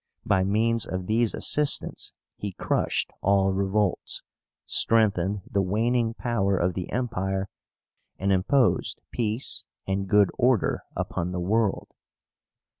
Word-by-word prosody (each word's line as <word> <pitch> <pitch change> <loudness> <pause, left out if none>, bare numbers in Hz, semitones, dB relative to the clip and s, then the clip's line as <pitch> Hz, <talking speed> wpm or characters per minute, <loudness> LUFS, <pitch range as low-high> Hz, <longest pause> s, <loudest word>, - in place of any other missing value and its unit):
By 95 -3 +3
means 110 +3 +1
of 95 0 -4
these 110 +2 +1
assistants 150 -1 +1 0.2
he 100 -2 -5
crushed - - -1
all 95 -1 +3
revolts, 100 0 -1 0.4
strengthened 105 -3 +2
the 100 - 0
waning 115 +4 +1
power 100 -6 0
of 90 +1 +1
the 90 0 -5
Empire, 95 -6 -2 0.7
and 100 +1 0
imposed 110 +7 +2
peace 115 +1 -1 0.2
and 95 0 -2
good 105 -1 +5
order 125 -3 +2
upon 90 +2 -2
the 90 - -2
world. 105 +3 0
100 Hz, 115 wpm, -26 LUFS, 95-115 Hz, 0.7 s, good